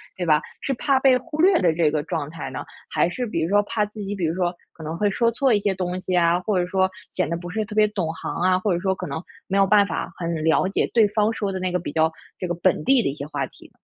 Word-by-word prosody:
对 180 Hz, -, -3 dB
吧。 155 Hz, -1 st, +4 dB, 0.2 s
是 270 Hz, -, -1 dB
怕 270 Hz, +1 st, +2 dB
被 265 Hz, -2 st, +5 dB
忽 310 Hz, +2 st, -4 dB
略 375 Hz, 0 st, +5 dB
的 170 Hz, -3 st, +3 dB
这 160 Hz, -2 st, +2 dB
个 150 Hz, -1 st, -1 dB
状 145 Hz, -, -3 dB
态 160 Hz, -1 st, -6 dB
呢？ -, -, -6 dB, 0.3 s
还 170 Hz, -, +2 dB
是 245 Hz, +7 st, -3 dB
比 190 Hz, -7 st, -2 dB
如 165 Hz, -, 0 dB
说 205 Hz, +1 st, +4 dB
怕 210 Hz, 0 st, 0 dB
自 210 Hz, +1 st, -12 dB
己 200 Hz, +1 st, -4 dB
比 180 Hz, -4 st, -1 dB
如 160 Hz, +2 st, -1 dB
说 180 Hz, -1 st, 0 dB, 0.2 s
可 160 Hz, -, -11 dB
能 160 Hz, +2 st, -4 dB
会 205 Hz, +1 st, +2 dB
说 230 Hz, +3 st, +2 dB
错 260 Hz, 0 st, +2 dB
一 205 Hz, -, +3 dB
些 200 Hz, -1 st, 0 dB
东 180 Hz, 0 st, -3 dB
西 185 Hz, 0 st, -2 dB
啊， 170 Hz, +1 st, +3 dB
或 195 Hz, -2 st, 0 dB
者 175 Hz, -, +1 dB
说 190 Hz, 0 st, +2 dB, 0.2 s
显 -, -, -1 dB
得 170 Hz, -, -1 dB
不 175 Hz, 0 st, -8 dB
是 215 Hz, +2 st, -2 dB
特 210 Hz, -, -9 dB
别 215 Hz, 0 st, +5 dB
懂 180 Hz, -6 st, -2 dB
行 -, -, -5 dB
啊， 185 Hz, 0 st, +3 dB
或 190 Hz, -1 st, 0 dB
者 170 Hz, -, 0 dB
说 190 Hz, +1 st, +1 dB
可 180 Hz, -, -6 dB
能 160 Hz, +4 st, -4 dB, 0.3 s
没 195 Hz, -, 0 dB
有 195 Hz, -, +5 dB
办 205 Hz, 0 st, +5 dB
法 -, -, -3 dB
很 170 Hz, -2 st, -3 dB
了 160 Hz, +3 st, +3 dB
解 195 Hz, -, 0 dB
对 225 Hz, -3 st, +5 dB
方 210 Hz, +1 st, +2 dB
说 200 Hz, -3 st, -2 dB
的 190 Hz, -, -3 dB
那 185 Hz, -1 st, -1 dB
个 180 Hz, -, 0 dB
比 -, -, -5 dB
较 160 Hz, 0 st, +2 dB, 0.3 s
这 180 Hz, -, -3 dB
个 175 Hz, -, -1 dB
本 175 Hz, -3 st, +1 dB
地 265 Hz, -3 st, +4 dB
的 -, -, 0 dB
一 -, -, -3 dB
些 140 Hz, -1 st, -6 dB
话 -, -, -2 dB
题。 -, -, -17 dB
185 Hz, 325 characters per minute, -23 LUFS, 170-210 Hz, 0.3 s, 被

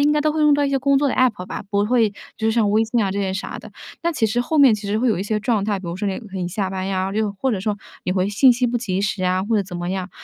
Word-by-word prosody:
应 295 Hz, +1 st, +4 dB
该 300 Hz, -, +2 dB
都 305 Hz, 0 st, +1 dB
会 310 Hz, -, -1 dB
用 300 Hz, -1 st, +5 dB
到 290 Hz, 0 st, +2 dB
一 -, -, +1 dB
些 275 Hz, -, +1 dB
工 275 Hz, +1 st, +3 dB
作 285 Hz, 0 st, +2 dB
的 -, -, -1 dB
APP 235 Hz, -8 st, +1 dB
吧， -, -, -6 dB
不 200 Hz, -1 st, +2 dB
会 225 Hz, -3 st, +2 dB, 0.2 s
就 220 Hz, 0 st, 0 dB
像 220 Hz, -2 st, +2 dB
微 215 Hz, +2 st, +3 dB
信 230 Hz, +1 st, 0 dB
啊 195 Hz, -, 0 dB
这 200 Hz, -, -3 dB
些 195 Hz, -1 st, -1 dB
啥 190 Hz, -, -5 dB
的。 -, -, -11 dB, 0.3 s
但 340 Hz, 0 st, 0 dB
其 225 Hz, -, +1 dB
实 230 Hz, +3 st, 0 dB
后 305 Hz, +6 st, -1 dB
面 270 Hz, -6 st, +7 dB
其 210 Hz, 0 st, -6 dB
实 205 Hz, +2 st, 0 dB
会 250 Hz, +2 st, +1 dB
有 220 Hz, -, +1 dB
一 -, -, -2 dB
些 210 Hz, +1 st, -1 dB
状 215 Hz, -3 st, 0 dB
态， 205 Hz, -1 st, -1 dB
比 190 Hz, -, -9 dB
如 170 Hz, +1 st, -4 dB
说 205 Hz, -, -3 dB
你 195 Hz, -1 st, -2 dB
可 210 Hz, -5 st, -10 dB
以 180 Hz, -, -2 dB
下 195 Hz, +1 st, -2 dB
班 190 Hz, 0 st, -4 dB
呀， 190 Hz, 0 st, -1 dB
又 215 Hz, -1 st, 0 dB
或 265 Hz, -, +1 dB
者 215 Hz, -, -1 dB
说 205 Hz, +1 st, -1 dB, 0.3 s
你 180 Hz, -, 0 dB
回 185 Hz, 0 st, 0 dB
信 245 Hz, +6 st, +5 dB
息 245 Hz, +1 st, 0 dB
不 240 Hz, 0 st, 0 dB
及 195 Hz, -6 st, -2 dB
时 200 Hz, -2 st, -1 dB
啊， 185 Hz, +1 st, +1 dB
或 220 Hz, +2 st, +1 dB
者 205 Hz, -, +2 dB
怎 180 Hz, -2 st, -8 dB
么 175 Hz, 0 st, -4 dB
样。 190 Hz, -1 st, -3 dB
210 Hz, 380 characters per minute, -21 LUFS, 195-245 Hz, 0.3 s, 面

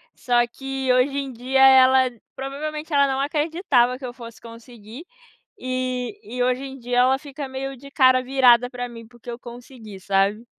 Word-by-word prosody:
Só 240 Hz, -1 st, +1 dB
que 270 Hz, +1 st, -3 dB
hoje 260 Hz, +3 st, +1 dB
em 270 Hz, -2 st, -5 dB
dia 255 Hz, +3 st, -1 dB
ela, 260 Hz, -1 st, +6 dB, 0.3 s
provavelmente 300 Hz, +4 st, -6 dB
ela 280 Hz, -1 st, +4 dB
não 265 Hz, 0 st, -2 dB
acreditava 290 Hz, -4 st, +1 dB
que 265 Hz, -, -9 dB
eu 245 Hz, -, -7 dB
fosse 235 Hz, -2 st, -12 dB
conseguir, 230 Hz, +2 st, -12 dB, 0.6 s
e 255 Hz, +6 st, -4 dB, 0.2 s
e 245 Hz, -, +1 dB
hoje 255 Hz, +1 st, 0 dB
em 270 Hz, 0 st, -8 dB
dia 245 Hz, 0 st, -1 dB
ela 260 Hz, +2 st, +3 dB
fica 285 Hz, -1 st, -8 dB
meio 270 Hz, +1 st, -5 dB
de 280 Hz, +3 st, -14 dB
cara 255 Hz, -2 st, +4 dB
virada 250 Hz, -2 st, +4 dB
pra 245 Hz, -1 st, -5 dB
mim 230 Hz, -1 st, -11 dB
porque 240 Hz, 0 st, -14 dB
eu 235 Hz, -, -7 dB
consegui, 240 Hz, -4 st, -12 dB
sabe? 200 Hz, +4 st, 0 dB
255 Hz, 175 wpm, -22 LUFS, 240-270 Hz, 0.6 s, ela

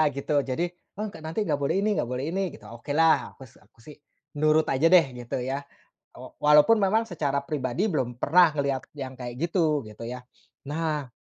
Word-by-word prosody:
gitu. 140 Hz, +2 st, -3 dB
Jadi, 135 Hz, +6 st, -2 dB, 0.3 s
mmm, 215 Hz, 0 st, -3 dB
k -, -, -12 dB
nanti 160 Hz, +7 st, -3 dB
nggak 150 Hz, -, +1 dB
boleh 140 Hz, -, 0 dB
ini 215 Hz, -, +1 dB
nggak 120 Hz, -, -1 dB
boleh 125 Hz, +2 st, -3 dB
ini, 190 Hz, +3 st, -1 dB
gitu. 105 Hz, -, -14 dB
Okelah, 150 Hz, +7 st, +1 dB
aku -, -, -22 dB
s -, -, -24 dB
aku -, -, -28 dB
sih, 150 Hz, -, -11 dB, 0.4 s
nurut 155 Hz, +1 st, +3 dB
aja 135 Hz, +5 st, +1 dB
deh, 180 Hz, -3 st, +7 dB
gitu 120 Hz, -1 st, -5 dB
ya. 135 Hz, +3 st, -3 dB, 0.5 s
Wa -, -, -11 dB, 0.2 s
walaupun 150 Hz, +9 st, +6 dB
memang, 215 Hz, +4 st, +3 dB
secara 145 Hz, -5 st, -1 dB
pribadi 145 Hz, -, -1 dB
belum 125 Hz, -7 st, -2 dB
pernah 170 Hz, 0 st, +5 dB
ngelihat 140 Hz, -3 st, -1 dB, 0.2 s
yang 130 Hz, -2 st, -5 dB
kayak 120 Hz, -1 st, -6 dB
gitu, 165 Hz, -4 st, +1 dB
gitu 105 Hz, +2 st, -11 dB
ya. 125 Hz, +2 st, -6 dB, 0.5 s
Nah 150 Hz, -3 st, -2 dB
150 Hz, 190 wpm, -26 LUFS, 130-165 Hz, 0.5 s, deh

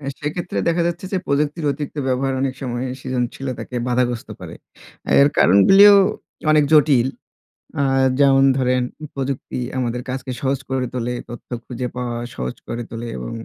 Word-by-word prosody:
অ্যা 140 Hz, -, -6 dB
সেক্ষেত্রে 160 Hz, +4 st, -3 dB
দেখা 170 Hz, +1 st, +2 dB
যাচ্ছে 170 Hz, +1 st, -3 dB
যে 190 Hz, -, +1 dB
প্রযুক্তির 150 Hz, +3 st, 0 dB
অতিরিক্ত 145 Hz, +1 st, -5 dB
ব্যবহার 130 Hz, +1 st, 0 dB
অনেক 135 Hz, -1 st, -1 dB
সময় 125 Hz, -1 st, -3 dB, 0.2 s
সৃজনশীলতাকে 125 Hz, 0 st, -4 dB
বাধাগ্রস্ত 120 Hz, -1 st, 0 dB
করে। -, -, -8 dB, 0.7 s
এর 140 Hz, -, +6 dB
কারণগুলিও 195 Hz, -, +7 dB, 0.6 s
অনেক 155 Hz, -1 st, +5 dB
জটিল। 140 Hz, -5 st, +5 dB, 0.7 s
আ -, -, +2 dB, 0.4 s
যেমন 135 Hz, -1 st, +5 dB
ধরেন, 125 Hz, -1 st, +1 dB, 0.3 s
প্রযুক্তি 135 Hz, -1 st, -4 dB, 0.2 s
আমাদের 125 Hz, -1 st, -2 dB
কাজকে 130 Hz, 0 st, -4 dB
সহজ 135 Hz, 0 st, 0 dB
করে 130 Hz, -1 st, -1 dB
তোলে, 125 Hz, -1 st, -2 dB, 0.2 s
তথ্য 120 Hz, -, -10 dB, 0.2 s
খুঁজে 125 Hz, 0 st, -4 dB
পাওয়া 120 Hz, -1 st, -3 dB, 0.2 s
সহজ 65 Hz, 0 st, -4 dB
করে 120 Hz, +1 st, -4 dB
তোলে 115 Hz, +1 st, -6 dB
এবং 60 Hz, -1 st, -6 dB
130 Hz, 145 wpm, -20 LUFS, 125-145 Hz, 0.7 s, কারণগুলিও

